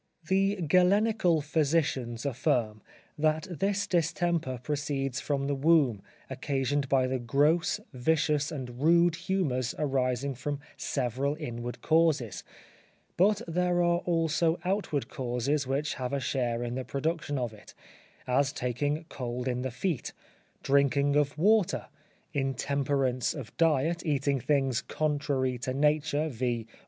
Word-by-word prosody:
The 195 +2 +2
Galenical 180 0 +3
physicians 145 -6 0
affirm, 120 -5 0 0.4
that 155 +1 +2
this 195 +4 0
distemper 170 -4 0
proceeds 140 -2 -2
from 140 -2 -1
the 140 - 0
womb; 140 -7 +3 0.3
occasioned 140 0 -1
by 135 -2 +3
the 130 0 -1
gross, 145 +7 +2
vicious 150 +2 +1
and 125 -4 -6
rude 170 +2 +4
humours 145 -10 -1
arising 135 -2 0
from 140 +3 -4 0.2
several 135 +2 -1
inward 120 -5 -6
causes; 155 - +2 0.7
but 200 +3 +3
there 175 +1 +1
are 175 0 +3
also 165 -1 +1
outward 185 -7 -1
causes 130 +3 -1
which 140 +3 -1
have 125 0 -4
a 140 - +1
share 120 -2 -1
in 120 0 -3
the 130 +1 -3
production 145 +1 -2
of 120 -3 -2
it; 105 - -15 0.5
as 135 +2 +2
taking 145 +6 -2
cold 125 0 -4
in 125 -1 -1
the 130 - -2
feet, 130 +4 -3 0.5
drinking 140 +1 +3
of 145 -1 +1
water, 205 +3 +2 0.4
intemperance 135 -2 0
of 130 -8 -8
diet, 165 +1 +2
eating 140 -3 0
things 135 -2 +1
contrary 140 -4 -1
to 130 +2 -3
nature, 150 +1 +1
viz. 120 -4 -2
140 Hz, 125 wpm, -29 LUFS, 130-160 Hz, 0.7 s, rude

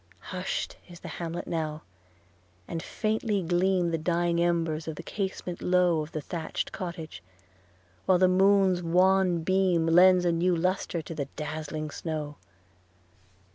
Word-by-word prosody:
Hush'd 185 +1 -3
is 175 -1 -12
the - - -8
hamlet 170 0 -4
now; 155 -2 -3 0.8
and 165 - -4
faintly 215 -1 -1
gleam 175 0 +1
The 165 - -1
dying 170 +1 +1
embers 165 -2 0
from 160 - -5
the 170 - -8
casement 190 -2 -4
low 180 -3 +3
Of 155 +1 -7
the 155 - -4
thatch'd 160 +2 -4
cottage; 170 - -6 0.9
while 185 - +5
the 185 +1 +5
moon's 190 0 +4
wan 180 0 +3
beam 185 -2 +2
Lends 180 +2 +6
a 175 - +3
new 175 +2 +2
lustre 180 -1 -1
to 165 - -7
the 145 -3 -3
dazzling 155 0 -4
snow. 150 -3 -5
175 Hz, 140 wpm, -28 LUFS, 160-185 Hz, 0.9 s, Lends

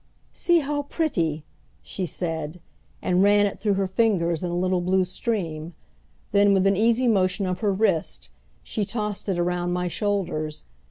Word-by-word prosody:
"See 345 -1 +3
how 290 0 -1
pretty!" 170 - -1 0.4
she 185 -2 -4
said, 160 -1 -4 0.4
and 180 0 +2
ran 205 +1 +5
it 200 - -3
through 205 -2 +1
her 195 0 +1
fingers 185 -5 +1
in 180 - -2
a 175 - -2
little 185 0 +1
blue 185 +1 +2
stream; 175 -5 -3 0.6
then, 200 0 +5
with 190 0 +2
an 195 0 +4
easy 230 +4 +3
motion 195 -2 +2
of 180 -1 -2
her 210 -2 +1
wrist, 165 - 0 0.3
she 215 - -2
tossed 210 0 -4
it 185 - 0
around 175 0 0
my 180 0 -1
shoulders. 175 - -2
190 Hz, 165 wpm, -25 LUFS, 175-205 Hz, 0.6 s, ran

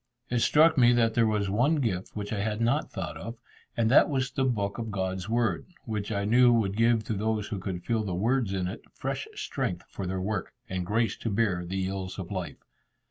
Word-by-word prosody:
It 120 - +2
struck 155 +4 +5
me 120 -1 +6
that 115 -2 +3
there 115 -1 +3
was 105 -2 0
one 120 +11 +2
gift 110 - -2
which 105 0 -4
I 105 - -2
had 105 +1 -1
not 115 +1 +1
thought - - -5
of, 115 +4 -6 0.4
and 115 -1 +2
that 140 - +6
was 130 -2 0
the 135 0 0
book 105 -4 -1
of 115 -1 -3
God's 95 -1 -3
Word, 115 -6 0 0.2
which 105 -1 -3
I 100 -1 -1
knew 120 +3 +6
would 105 -4 +2
give 115 0 +3
to 110 - -3
those 105 0 -1
who 105 -4 -3
could 95 -1 -5
feel 115 -2 +1
the 95 -4 -3
words 115 +2 +1
in 95 -2 -1
it, 90 - -6
fresh - - -3
strength 90 -1 -3
for 95 - -5
their 95 +1 -2
work, 100 0 -3
and 90 -1 -3
grace 110 0 +1
to 115 - -3
bear 100 -4 +1
the 95 +2 -2
ills 95 -1 -4
of 95 -2 -6
life. 90 -8 -5
105 Hz, 225 wpm, -28 LUFS, 95-115 Hz, 0.4 s, me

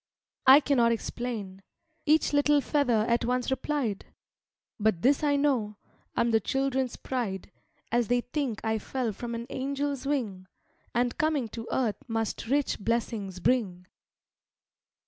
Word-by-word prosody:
"I 270 +3 +10
cannot 245 -5 +3
explain," 225 -4 -4 0.5
Each 310 0 +3
little 290 0 +4
feather 250 -7 +2
at 235 +1 +2
once 250 +2 0
replied; 265 -7 -2 0.7
"But 215 -5 +1
this 275 +3 +4
I 290 -1 +3
know, 255 -8 +1 0.4
I'm 235 - +2
the 225 - +4
children's 265 +2 -1
pride, 225 -8 -4 0.4
As 240 -1 +2
they 245 0 +2
think 250 -3 -3
I 220 0 +1
fell 245 0 -2
from 235 +3 -5
an 230 0 -5
angel's 280 0 -2
wing, 210 -10 -2 0.5
And 245 0 0
coming 305 -7 +1
to 225 +1 -7
earth 235 -5 0
must 225 -1 -2
rich 280 +3 +1
blessings 215 -4 -2
bring. 185 -5 0
240 Hz, 135 wpm, -28 LUFS, 220-275 Hz, 0.7 s, I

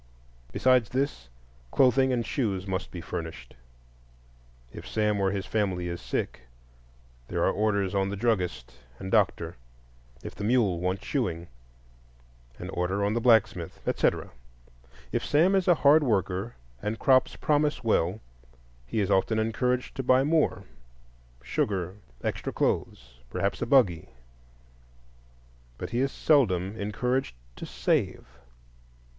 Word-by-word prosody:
Besides 125 -4 +3
this, 130 - -2 0.4
clothing 130 - +4
and 120 -2 0
shoes 100 -8 -1
must 95 -1 -3
be 90 - -7
furnished; 80 -7 -7 1.2
if - - -9
Sam 105 -1 0
or 95 - +2
his 100 0 -3
family 95 -5 -1
is 85 0 -5
sick, - - -3 0.9
there - - -1
are - - +3
orders 100 -3 0
on 100 0 +1
the 100 - -3
druggist 100 - -1 0.2
and 95 - -7
doctor; 85 - +1 0.7
if - - -7
the 100 - -7
mule 105 -6 +2
wants 90 +2 -2
shoeing, 85 +1 -2 1.1
an - - -7
order 95 +3 -1
on 105 - 0
the 120 - 0
blacksmith, 110 -8 +2
etc. - - 0 0.8
If - - -1
Sam 165 +6 +3
is 190 -2 +2
a 175 - +6
hard 150 +1 +5
worker 100 -2 -1 0.3
and 110 +2 -2
crops 130 +1 +3
promise 150 -2 +1
well, 105 -2 +1 0.7
he 110 - -1
is 100 0 0
often 95 +4 +2
encouraged 125 +3 0
to - - 0
buy 130 +1 +4
more,—sugar, 60 - -3 0.3
extra - - -2
clothes, - - -2
perhaps - - -2
a - - -1
buggy. 100 - +3 1.7
But - - -6
he 120 - 0
is 135 +1 +1
seldom 100 - +2
encouraged 110 - -2 0.2
to - - -7
save. 60 0 0
100 Hz, 130 wpm, -27 LUFS, 90-125 Hz, 1.7 s, a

